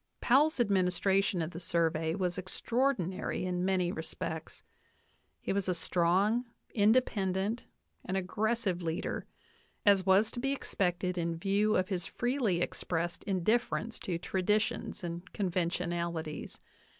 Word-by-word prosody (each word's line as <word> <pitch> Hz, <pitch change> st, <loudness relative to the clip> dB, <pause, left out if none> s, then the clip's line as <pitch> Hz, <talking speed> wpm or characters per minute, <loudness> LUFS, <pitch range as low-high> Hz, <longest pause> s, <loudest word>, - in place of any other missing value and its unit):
Powell's 285 Hz, +4 st, +4 dB
administration 195 Hz, -3 st, +2 dB
of 160 Hz, -, -4 dB
the 170 Hz, -, -7 dB
Survey 165 Hz, -2 st, +1 dB
was 185 Hz, -2 st, -1 dB
extraordinary 190 Hz, -2 st, -1 dB
in 180 Hz, -1 st, -1 dB
many 185 Hz, -2 st, +1 dB
respects. 160 Hz, -1 st, -5 dB, 0.8 s
He -, -, -2 dB
was 195 Hz, -1 st, 0 dB
a 180 Hz, -, +1 dB
strong, 185 Hz, +8 st, +2 dB, 0.3 s
independent, 210 Hz, -1 st, +2 dB, 0.4 s
and 190 Hz, -, -2 dB
aggressive 205 Hz, 0 st, 0 dB
leader, 165 Hz, +1 st, -3 dB, 0.6 s
as 200 Hz, -2 st, +6 dB
was 195 Hz, +3 st, +4 dB
to -, -, -5 dB
be 270 Hz, +2 st, 0 dB
expected 180 Hz, -7 st, -1 dB
in 165 Hz, -1 st, -1 dB
view 200 Hz, +4 st, +2 dB
of 185 Hz, +1 st, +1 dB
his 180 Hz, -3 st, -2 dB
freely 240 Hz, -8 st, 0 dB
expressed 175 Hz, -1 st, -2 dB
indifference 215 Hz, +4 st, 0 dB
to 175 Hz, -3 st, -2 dB
traditions 210 Hz, +4 st, -1 dB
and 175 Hz, +1 st, -5 dB
conventionalities. 170 Hz, -3 st, -2 dB
185 Hz, 120 wpm, -31 LUFS, 175-210 Hz, 0.8 s, as